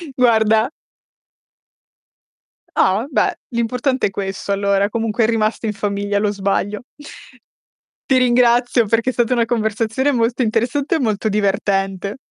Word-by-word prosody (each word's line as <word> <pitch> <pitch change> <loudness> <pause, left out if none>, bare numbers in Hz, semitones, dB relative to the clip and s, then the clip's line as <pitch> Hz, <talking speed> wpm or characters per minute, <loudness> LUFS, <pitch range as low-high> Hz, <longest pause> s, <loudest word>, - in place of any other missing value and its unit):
Guarda 220 -1 +3 2.1
Ah, 190 - +3
va 220 +7 -2
beh, 270 - +1
l'importante 250 +2 0
è - - -8
questo 195 0 -4
allora, 200 0 +1
comunque 225 0 0
è - - +1
rimasto 225 0 0
in 215 - -1
famiglia 205 0 -2
lo 205 0 0
sbaglio. 200 +2 -2 1.3
Ti 265 - +4
ringrazio 245 -1 +3
perché 230 +3 +1
è - - -2
stata 240 +1 +1
una 235 -2 +2
conversazione 225 +3 0
molto 240 0 0
interessante 245 +7 0
e - - 0
molto 220 -3 -1
divertente. 195 0 -1
220 Hz, 130 wpm, -19 LUFS, 205-240 Hz, 2.1 s, Ti